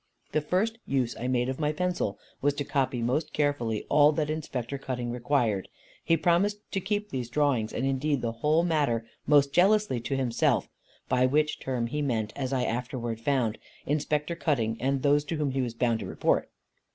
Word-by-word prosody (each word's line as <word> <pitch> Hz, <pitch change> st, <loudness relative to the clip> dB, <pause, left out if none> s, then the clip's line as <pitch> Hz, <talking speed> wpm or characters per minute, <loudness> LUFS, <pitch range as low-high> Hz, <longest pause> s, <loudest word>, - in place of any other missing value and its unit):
The 155 Hz, -, +1 dB
first 210 Hz, +9 st, 0 dB
use 130 Hz, -3 st, 0 dB
I 125 Hz, -, -2 dB
made 125 Hz, -1 st, +1 dB
of 130 Hz, +2 st, -3 dB
my 150 Hz, -1 st, +1 dB
pencil 160 Hz, -, -1 dB, 0.2 s
was 145 Hz, +1 st, +2 dB
to 145 Hz, -, -2 dB
copy 130 Hz, -3 st, 0 dB
most 150 Hz, +6 st, -1 dB
carefully 130 Hz, -7 st, 0 dB
all 150 Hz, 0 st, +6 dB
that 150 Hz, -1 st, -1 dB
Inspector 140 Hz, -4 st, -4 dB
Cutting 125 Hz, -3 st, -3 dB
required. 120 Hz, -5 st, 0 dB, 0.4 s
He 165 Hz, 0 st, +3 dB
promised 180 Hz, +6 st, +2 dB
to 195 Hz, -, 0 dB
keep 205 Hz, +2 st, -2 dB
these 125 Hz, -3 st, -3 dB
drawings, 130 Hz, -6 st, +1 dB
and 130 Hz, -, -2 dB
indeed 135 Hz, 0 st, 0 dB
the 115 Hz, -, 0 dB
whole 150 Hz, +8 st, +2 dB
matter, 145 Hz, -9 st, +1 dB, 0.2 s
most 140 Hz, -1 st, +4 dB
jealously 195 Hz, -, +3 dB
to 135 Hz, +4 st, -2 dB
himself; 125 Hz, -3 st, +1 dB, 0.4 s
by 130 Hz, 0 st, +3 dB
which 150 Hz, +3 st, +1 dB
term 125 Hz, -3 st, -2 dB
he 150 Hz, +5 st, -2 dB
meant, 115 Hz, -6 st, -1 dB
as 130 Hz, -2 st, -3 dB
I 130 Hz, -2 st, +1 dB
afterwards 120 Hz, -1 st, -3 dB
found, 120 Hz, -4 st, 0 dB, 0.3 s
Inspector 150 Hz, +2 st, 0 dB
Cutting 120 Hz, -10 st, 0 dB
and 135 Hz, +1 st, 0 dB
those 145 Hz, 0 st, +4 dB
to 165 Hz, -, -3 dB
whom 150 Hz, -3 st, 0 dB
he 135 Hz, 0 st, 0 dB
was 120 Hz, -2 st, -3 dB
bound 115 Hz, -2 st, +1 dB
to 100 Hz, -, -5 dB
report. -, -, +1 dB
135 Hz, 190 wpm, -28 LUFS, 120-150 Hz, 0.4 s, all